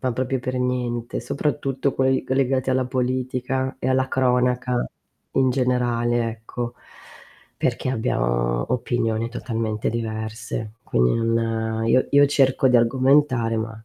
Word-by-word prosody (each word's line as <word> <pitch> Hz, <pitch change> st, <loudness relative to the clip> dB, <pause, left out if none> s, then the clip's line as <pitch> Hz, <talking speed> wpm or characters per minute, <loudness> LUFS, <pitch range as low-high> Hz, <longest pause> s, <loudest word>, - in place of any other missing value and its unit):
Ma 130 Hz, -2 st, 0 dB
proprio 130 Hz, +2 st, -1 dB
per 130 Hz, +1 st, -3 dB
niente, 125 Hz, -2 st, -2 dB
soprattutto 140 Hz, +1 st, -1 dB
quei 130 Hz, 0 st, +1 dB
legati 130 Hz, 0 st, +1 dB
alla 130 Hz, 0 st, +2 dB
politica 130 Hz, +1 st, -1 dB
e 130 Hz, -, -1 dB
alla 130 Hz, 0 st, +2 dB
cronaca 125 Hz, -1 st, +1 dB, 0.5 s
in 130 Hz, -1 st, +3 dB
generale 120 Hz, -2 st, +1 dB
ecco, 115 Hz, +2 st, -6 dB, 0.8 s
perché 130 Hz, -, -1 dB
abbiamo -, -, 0 dB
opinione 115 Hz, -2 st, -1 dB
totalmente 115 Hz, -3 st, -3 dB
diverse. 110 Hz, -1 st, -4 dB
Quindi 60 Hz, 0 st, +2 dB
non 115 Hz, -1 st, 0 dB
io 130 Hz, +3 st, +3 dB
io 145 Hz, 0 st, +6 dB
cerco 135 Hz, -2 st, +3 dB
d'argomentare, 125 Hz, -1 st, +3 dB
ma 110 Hz, 0 st, -5 dB
125 Hz, 115 wpm, -23 LUFS, 115-130 Hz, 0.8 s, io